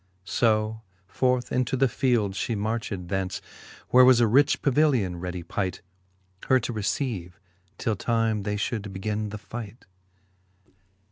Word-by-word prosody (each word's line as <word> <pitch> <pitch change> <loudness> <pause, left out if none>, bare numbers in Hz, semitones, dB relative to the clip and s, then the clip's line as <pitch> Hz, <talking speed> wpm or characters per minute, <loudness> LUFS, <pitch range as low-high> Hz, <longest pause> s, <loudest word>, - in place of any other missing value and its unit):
So 110 0 +1 0.2
forth 125 +5 0
into 125 +1 0
the 135 +1 +4
field 115 -5 +1
fhe 110 +3 -2
marched 105 -4 -3
thence, 95 -1 -2 0.5
Where 130 +1 +7
was 125 -1 +7
a 120 - +5
rich 130 +7 +3
pavilion 130 - +2
ready 90 0 -5
pight. 95 +2 -3 0.6
Her 130 - +5
to 120 - -3
receive, 100 -4 -3 0.4
till 110 -3 -1
time 115 0 0
they 105 +1 -2
fhould 105 -1 -3
begin 105 +2 -3
the 105 - -6
fight. 115 +1 -9
110 Hz, 135 wpm, -26 LUFS, 100-125 Hz, 0.6 s, Where